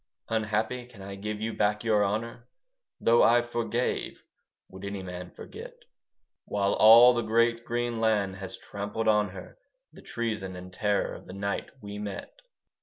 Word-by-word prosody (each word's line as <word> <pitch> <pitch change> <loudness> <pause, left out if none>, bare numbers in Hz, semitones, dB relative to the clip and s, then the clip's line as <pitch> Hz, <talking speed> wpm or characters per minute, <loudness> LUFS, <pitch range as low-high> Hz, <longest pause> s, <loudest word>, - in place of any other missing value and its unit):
Unhappy, 110 +3 -1
can 110 -6 -13
I 100 0 -7
give 105 +2 -5
you 110 +1 -2
back 105 +1 +1
your 110 -3 +3
honour? 115 +4 -3 0.5
Though 115 +1 +4
I 120 +1 +5
forgave, 120 +1 -2 0.4
would 95 +1 -12
any 100 -1 -5
man 90 -1 -7
forget? - - -10 0.7
While 100 -1 0
all 115 +3 +9
the 120 - 0
great 115 +1 +2
green 120 -1 -2
land 105 -4 +1
has 95 -1 -7
trampled 100 +2 -4
on 105 -1 +3
her 100 - -11 0.3
The - - -13
treason 110 -6 -3
and 90 0 -10
terror 105 +1 0
of - - -11
the 90 - -9
night 100 +1 -3
we 100 0 -6
met. 100 -1 -6
105 Hz, 160 wpm, -28 LUFS, 100-115 Hz, 0.7 s, all